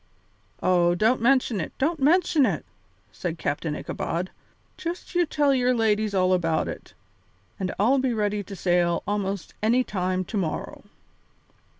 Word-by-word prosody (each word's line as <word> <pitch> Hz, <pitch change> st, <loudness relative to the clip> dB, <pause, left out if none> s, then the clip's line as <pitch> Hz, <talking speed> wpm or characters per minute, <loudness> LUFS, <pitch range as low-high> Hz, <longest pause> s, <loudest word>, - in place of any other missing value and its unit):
"Oh, 175 Hz, -1 st, +3 dB
don't 225 Hz, +6 st, +2 dB
mention 245 Hz, -5 st, +2 dB
it, -, -, -6 dB
don't 310 Hz, +4 st, 0 dB
mention 310 Hz, +1 st, +4 dB
it," -, -, 0 dB, 0.5 s
said 170 Hz, -2 st, -4 dB
Captain 150 Hz, 0 st, -2 dB
Ichabod; 175 Hz, +4 st, -3 dB, 0.4 s
"just 355 Hz, 0 st, -6 dB
you 350 Hz, -2 st, +2 dB
tell 290 Hz, -2 st, +2 dB
your 250 Hz, -1 st, +2 dB
ladies 215 Hz, -2 st, +1 dB
all 185 Hz, 0 st, +3 dB
about 165 Hz, -3 st, +1 dB
it, -, -, -8 dB, 0.6 s
and 185 Hz, -1 st, -2 dB
I'll 245 Hz, +7 st, +3 dB
be 260 Hz, -1 st, +1 dB
ready 210 Hz, -2 st, 0 dB
to 200 Hz, -, -8 dB
sail 175 Hz, -1 st, +1 dB
almost 200 Hz, -2 st, -3 dB
any 235 Hz, +4 st, +3 dB
time 185 Hz, -3 st, -2 dB
to 215 Hz, -, -4 dB
morrow." 170 Hz, -5 st, -3 dB
210 Hz, 145 wpm, -25 LUFS, 180-255 Hz, 0.6 s, mention